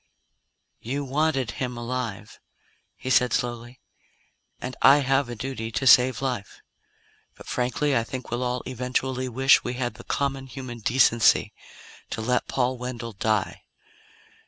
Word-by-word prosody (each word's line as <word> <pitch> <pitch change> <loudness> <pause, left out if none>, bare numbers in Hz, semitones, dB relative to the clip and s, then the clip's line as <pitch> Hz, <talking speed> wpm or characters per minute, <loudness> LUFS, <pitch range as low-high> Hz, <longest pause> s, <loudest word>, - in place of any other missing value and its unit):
"You 140 +5 -3
wanted 135 -2 0
him 125 -2 -4
alive," 120 -3 -5 0.6
he 130 - -5
said 125 -1 +4
slowly, 120 -1 -3 0.8
"and 130 +1 -6
I 140 +2 +7
have 135 -1 +1
a 120 - -5
duty 115 -1 -5
to 130 +3 -1
save 130 +1 +6
life. 120 -7 -3 0.8
But - - -13
frankly, 130 +3 0
I 115 - +2
think 125 +1 -7
we'll 120 +1 -1
all 125 0 -2
eventually 130 +1 -2
wish 135 +3 +4
we 125 - -3
had 120 -2 -2
the 115 +2 -13
common 135 -1 -2
human 130 -2 -8
decency 115 0 +3 0.6
to - - -4
let 125 +3 0
Paul 130 -1 -1
Wendell 120 -2 -5
die. 105 0 -1
125 Hz, 140 wpm, -25 LUFS, 120-130 Hz, 0.8 s, I